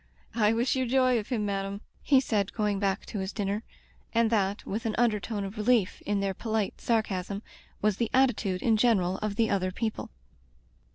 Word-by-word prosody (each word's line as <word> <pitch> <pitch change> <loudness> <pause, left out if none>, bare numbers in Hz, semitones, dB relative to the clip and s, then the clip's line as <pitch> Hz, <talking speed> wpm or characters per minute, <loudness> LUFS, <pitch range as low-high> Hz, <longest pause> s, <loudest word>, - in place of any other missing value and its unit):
"I 215 -2 +3
wish 235 +4 +1
you 260 -1 0
joy 255 -1 +3
of 210 - -7
him, 225 -5 -1
madam," 200 0 -3 0.2
he 275 -3 +5
said, 210 -6 0
going 210 -3 0
back 195 -1 0
to 205 - -5
his 190 +1 -3
dinner, 205 0 -2 0.5
and 230 -1 +3
that, 200 -2 0
with 225 +4 -3
an 215 - -1
undertone 215 -2 0
of 195 +3 -6
relief 215 -3 +2
in 205 -1 +1
their 195 -1 0
polite 220 0 -2
sarcasm, 200 -3 -1 0.4
was 210 -2 +2
the 230 -2 0
attitude 225 -8 +2
in 225 -2 +3
general 195 -5 +2
of 210 -1 -2
the 225 0 +2
other 185 -2 +1
people. 220 +3 -3
210 Hz, 185 wpm, -28 LUFS, 200-230 Hz, 0.5 s, he